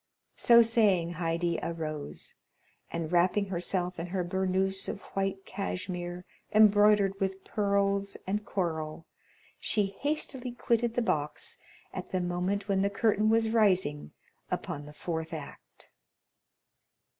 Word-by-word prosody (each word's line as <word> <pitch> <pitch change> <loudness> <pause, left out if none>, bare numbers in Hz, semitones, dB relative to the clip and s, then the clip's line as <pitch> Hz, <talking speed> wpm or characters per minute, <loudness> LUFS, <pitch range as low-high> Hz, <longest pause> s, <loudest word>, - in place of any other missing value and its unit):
So 235 -1 +7
saying, 200 -7 +3
Haydée 170 0 -1
arose, 155 -3 -5 0.6
and 165 -1 -4
wrapping 185 +3 +3
herself 180 0 -1
in 170 - -3
her 180 0 -1
burnouse 190 +1 0
of 200 - -5
white 195 0 -1
cashmere 180 -2 -4 0.3
embroidered 205 -2 +5
with 190 -1 -2
pearls 200 -1 0
and 205 +3 -1
coral, 160 -5 -3 0.5
she 200 -2 0
hastily 270 -4 -2
quitted 235 -1 0
the 245 - +2
box 150 -8 -2 0.3
at - - -6
the 185 - +1
moment 180 +3 -1
when 195 -2 +2
the 200 - +2
curtain 215 +1 +2
was 225 0 +3
rising 185 - +2 0.4
upon 145 0 -4
the 150 - -11
fourth 160 +1 -4
act. 155 -3 -9
190 Hz, 120 wpm, -30 LUFS, 175-205 Hz, 0.6 s, So